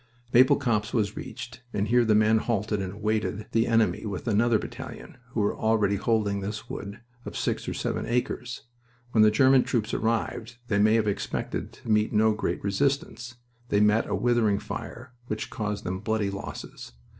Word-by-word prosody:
Maple 130 +2 +7
Copse 115 -3 -1
was 105 -3 0
reached, 125 0 -8
and 105 +1 0
here 120 +1 +5
the 110 -2 +3
men 110 +1 +4
halted 105 -2 -1
and 95 -1 -4
awaited 105 0 -2
the 115 +1 +2
enemy 115 -1 +2
with 100 0 -5
another 115 +1 +3
battalion 130 +3 -8
who 120 -3 -1
were 105 - +1
already 110 -2 +2
holding 105 -1 +1
this 105 +2 -5
wood 100 +2 -7 0.2
of - - -6
six - - -2
or - - -4
seven - - -2
acres. 125 0 -2 0.5
When 110 - +4
the 110 - +7
German 130 +4 +5
troops 115 -2 -1
arrived 115 +1 -1
they 100 -2 +2
may 110 +2 +5
have 110 -2 +2
expected 100 - -3
to 110 - -6
meet 105 0 +3
no 110 +1 +4
great 105 - -2
resistance. 120 +2 -1 0.3
They 100 - +3
met 105 +2 +3
a 100 - 0
withering 110 -1 +2
fire, 125 +5 -7
which - - -4
caused 105 -3 -3
them 95 +1 -3
bloody 110 -1 -1
losses. 100 -9 -8
110 Hz, 180 wpm, -27 LUFS, 105-120 Hz, 0.5 s, Maple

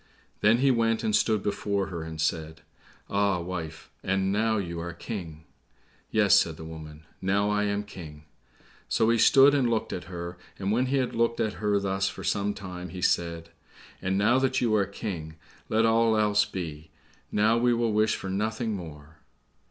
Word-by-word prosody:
Then 110 +3 +4
he 135 +2 +3
went 115 -2 +1
and 215 -1 +1
stood 110 - +2
before 100 -1 -1
her, 85 -3 -5
and 80 0 -7
said, 80 0 -2 0.5
"Ah, 100 -2 +1
wife, 85 -3 -6
and 95 0 0
now 110 +2 +1
you 85 -4 -3
are 85 +1 -5
King." 85 -5 -7 0.7
"Yes," - - +5
said - - -1
the 80 - -8
woman, 80 -1 -10 0.2
"now 100 +2 +1
I 105 0 +1
am 100 0 -1
King." 80 -7 -10 0.7
So 110 +1 +3
he 115 - +2
stood 140 +4 +7
and 135 -4 +2
looked 115 -2 -1
at 90 - -5
her, 85 -1 -7 0.2
and 100 +1 -2
when 125 +4 +2
he 140 +2 +1
had 130 -2 0
looked 115 0 +1
at 110 - 0
her 105 -1 +2
thus 95 0 0
for - - -9
some 100 0 0
time, 90 -2 -7
he 90 +2 -7
said, 85 -1 0 0.5
"And 95 +1 0
now 115 +6 +4
that 130 -1 +1
you 115 -3 +1
are 100 -2 +2
King, 90 -6 -6 0.3
let 110 +1 +3
all 115 0 +3
else 105 -1 +3
be, 80 -4 -6 0.4
now 110 +3 +3
we 120 +1 +3
will 115 -2 +1
wish 110 +1 +2
for 95 - -5
nothing 110 +3 -1
more." 80 -3 -10
100 Hz, 185 wpm, -27 LUFS, 85-110 Hz, 0.7 s, stood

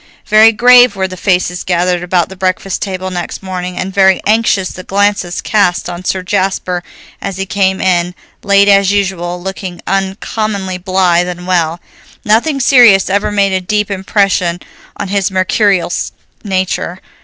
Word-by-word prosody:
Very 215 +1 +6
grave 245 +2 +5
were 190 -1 -1
the 185 - -8
faces 180 -1 -1
gathered 180 0 0
about 180 -1 0
the 190 - -10
breakfast 185 +1 -2
table 185 -1 -4
next 175 +1 -5
morning, 180 -1 -5
and 190 +1 -4
very 190 -1 +4
anxious 210 -3 +1
the 185 - -9
glances 200 -2 -1
cast 180 -4 0
on 175 +1 -8
Sir 185 0 -2
Jasper 185 -2 -1 0.4
as 195 -2 -5
he 195 - -3
came 190 -1 0
in, 180 -1 0 0.3
late 200 0 +3
as 200 -1 +4
usual, 190 -3 -2
looking 185 -1 -6
uncommonly 195 0 -3
blithe 180 -1 +1
and 180 0 -7
well. 170 -2 0 0.5
Nothing 240 +7 +2
serious 240 -8 +5
ever 200 +1 0
made 200 -2 +1
a 185 - 0
deep 210 +2 -1
impression 190 -3 0 0.4
on - - -5
his 200 -1 0
mercurial 190 -1 +1 0.5
nature. 190 -2 -2
190 Hz, 155 wpm, -13 LUFS, 180-200 Hz, 0.5 s, Very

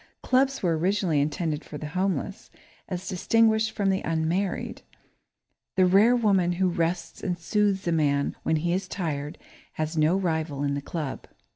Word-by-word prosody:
Clubs 270 -1 +2
were 165 -3 +1
originally 180 -4 +1
intended 150 +1 -2
for 150 - -8
the 150 0 -6
homeless, 185 +1 -2 0.4
as 185 -1 -4
distinguished 220 +3 +2
from 200 -3 0
the 190 - 0
unmarried. 165 +4 -1 0.9
The 185 -2 +5
rare 200 +7 +5
woman 195 -7 +2
who 185 +1 +1
rests 170 0 -2
and 180 -3 -2
soothes 200 +1 0
a - - +2
man 145 -3 +1
when 160 - +1
he 170 +2 0
is 185 0 -2
tired 150 -6 -4 0.4
has 155 +1 -3
no 155 +5 +3
rival 160 -6 -1
in 140 0 0
the 140 - -2
club. 150 -2 -5
175 Hz, 160 wpm, -26 LUFS, 155-195 Hz, 0.9 s, The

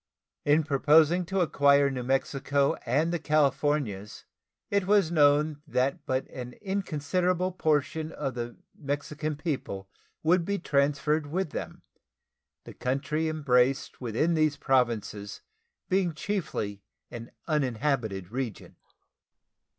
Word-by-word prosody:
In 150 +2 +4
proposing 155 +4 +4
to 190 0 0
acquire 140 -3 +4
New 130 -2 -3
Mexico 135 +2 +1
and 155 +8 +1
the 170 - 0
Californias, 140 -8 0 0.5
it 200 -2 +1
was 200 -5 +4
known 150 -1 +3
that 140 +3 -1
but 130 0 -1
an 125 -1 -7
inconsiderable 185 - -1
portion 155 -2 0
of 135 - -3
the 120 0 -5 0.2
Mexican 150 +1 -3
people 135 - -4 0.4
would 170 +2 +3
be 200 +3 -1
transferred 145 -1 +1
with 170 +1 -2
them, - - -6 0.8
the - - -10
country 140 +5 -1
embraced 135 -5 +1
within 125 +8 0
these 155 -2 +2
Provinces 115 -7 0 0.5
being 185 -4 +1
chiefly 150 - -3 0.3
an 120 -1 -8 0.2
uninhabited 120 - -1
region. 125 -4 -5
145 Hz, 110 wpm, -28 LUFS, 130-160 Hz, 0.8 s, In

